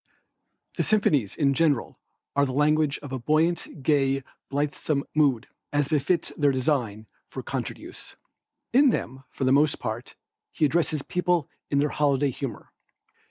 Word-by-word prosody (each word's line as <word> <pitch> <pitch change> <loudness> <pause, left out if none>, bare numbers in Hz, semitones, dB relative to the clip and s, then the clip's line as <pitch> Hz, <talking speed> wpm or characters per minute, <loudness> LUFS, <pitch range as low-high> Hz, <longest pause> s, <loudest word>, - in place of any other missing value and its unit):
The - - +2
symphonies 150 - +2
in 140 -2 +2
general 145 -3 +1 0.4
are 140 0 +3
the 130 - -4
language 150 +1 +2
of 145 - -8
a 130 - -3
buoyant, 155 +2 0
gay, 135 -2 +2 0.3
blithesome 145 0 -1
mood, 140 -6 +2 0.3
as 145 -1 +1
befits 160 +3 +1
their 145 -2 +3
design 125 -6 -1 0.2
for - - -7
concert - - -4
use. - - -12 0.6
In 275 +2 +6
them, 130 - -3
for - - -5
the 130 - +3
most 145 +2 +4
part, 110 +3 -5 0.4
he 155 - +1
addresses 155 -1 0
people 180 -4 0 0.2
in 140 - +1
their 145 +1 +2
holiday 140 -2 +1
humor. 125 -3 -7
145 Hz, 150 wpm, -26 LUFS, 135-155 Hz, 0.6 s, In